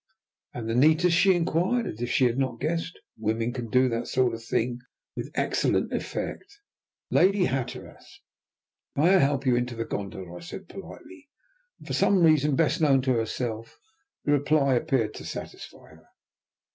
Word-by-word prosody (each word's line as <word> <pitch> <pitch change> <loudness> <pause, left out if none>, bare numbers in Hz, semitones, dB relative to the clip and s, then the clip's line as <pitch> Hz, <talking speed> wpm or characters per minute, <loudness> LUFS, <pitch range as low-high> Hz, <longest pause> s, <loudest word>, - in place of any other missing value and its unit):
"And 115 -2 -6
the 115 - -1
neatest?" 160 +7 +4
she 190 +2 +5
inquired, 180 +8 +1
as 110 - -6
if 120 - -2
she 140 -1 +3
had 120 +2 +1
not 130 -4 -1
guessed. 165 +1 -2 0.2
Women 115 +2 -1
can 120 -3 -5
do 130 +3 +4
that 115 -1 -3
sort 125 -2 +1
of 115 0 -7
thing 120 +1 -1 0.4
with - - -5
excellent - - 0
effect. - - -5 0.5
"Lady 195 0 +4
Hatteras, 130 -3 -5 0.8
may 165 +7 +4
I 190 - +6
help 140 0 +1
you 125 -2 +3
into 120 0 -2
the 115 0 -3
gondola?" 95 -3 -6
I - - -9
said 130 - -9
politely, 295 - -12 0.5
and - - -16
for - - -5
some 190 -3 +3
reason, 150 -3 +4
best 160 +2 +1
known 135 -4 +4
to 130 -1 +2
herself, 115 0 -3 0.5
the 145 - +1
reply 145 -1 +3
appeared 130 -4 0
to - - -9
satisfy - - -9
her. - - -19
135 Hz, 170 wpm, -26 LUFS, 120-165 Hz, 0.8 s, I